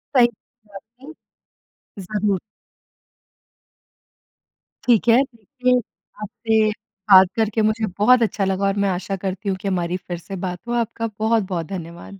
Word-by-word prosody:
सही 245 -2 +7 0.5
बात 245 +7 -17 0.9
है। - - -8
ज़रूर। 205 0 -1 2.5
ठीक 240 -2 +3
है। 235 +3 +6
देखिए, 250 +1 -1 0.4
आपसे 220 0 +1 0.4
बात 190 -1 +9
करके 220 0 0
मुझे 215 +1 +1
बहुत 245 +4 +5
अच्छा 205 -2 0
लगा 190 +1 0
और 195 - 0
मैं - - +2
आशा 190 +1 -2
करती 195 +2 -3
हूँ 190 - -1
कि - - -4
हमारी 180 -2 -1
फिर 175 -1 -7
से 195 +3 -8
बात 180 0 -5
हो। 240 - -2
आपका 230 -1 -1
बहुत-बहुत 210 -6 0
धन्यवाद। 175 +2 -8
210 Hz, 140 wpm, -21 LUFS, 190-230 Hz, 2.5 s, बात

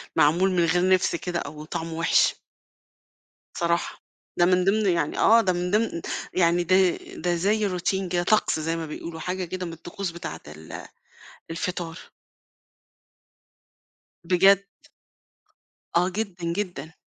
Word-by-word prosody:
معمول 175 +6 +4
من 175 -2 +2
غير 175 +2 +2
نِفْس 185 -2 +3
كده 175 0 -3
أو 150 0 -7
طعمه 165 +1 -5
وِحِش. 165 +1 +3 1.2
صراحة، 170 0 -1 0.4
ده 175 - +6
من 180 0 +3
ضمن 210 +2 +2
يعني 170 -4 0
آه 230 +1 +6
ده 185 -4 +1
من 180 +1 -2
ضمن 210 -5 0 0.3
يعني 175 -1 +3
ده 185 +2 +3 0.4
ده 175 -1 -1
زيّ 205 +4 +1
Routine 190 +1 -1
كده 175 -1 +1
طقس 210 -4 +2
زيّ 165 +1 -1
ما 165 -1 -4
بيقولوا 160 +1 -7
حاجة 180 +2 -3
كده 185 +1 -5
من 165 - -6
الطقوس 175 +3 -6
بتاعة 80 - -7
ال 80 +1 -9 0.7
الفطار. 170 -1 -4 2.3
بجد. 190 +3 +5 1.3
آه 180 +2 +3
جدًا، 180 -4 -3
جدًا. 175 -4 -4
175 Hz, 135 wpm, -25 LUFS, 165-185 Hz, 2.3 s, ده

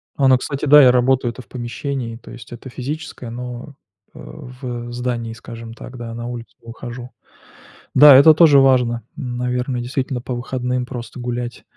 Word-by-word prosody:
А, 135 - +2
ну, 130 -1 +6
кстати, 140 +2 -4
да, 150 +1 +8
я 130 -2 +7
работаю-то 125 0 +1
в - - -20
помещении, 120 0 -5
то - - -15
есть 120 - -12
это 120 +2 -9
физическое, 135 0 -6
но, 125 +3 -7 0.4
э, - - -13
в, 120 - -8
э, - - -8
здании, 120 -2 -3
скажем 115 -1 -10
так, 125 +2 -11
да, 115 -1 -7
на 120 +1 -6
улицу 120 -1 -8
выхожу. 120 +1 -9 0.8
Да, 145 +1 +9
это 140 +4 +8
тоже 155 -3 +6
важно, 125 -3 +3
наверное, 125 -1 -3
действительно 130 +1 -3
по 125 - -5
выходным 125 +1 -3
просто 120 -2 -8
гулять. 120 0 -5
125 Hz, 170 wpm, -19 LUFS, 120-130 Hz, 0.8 s, Да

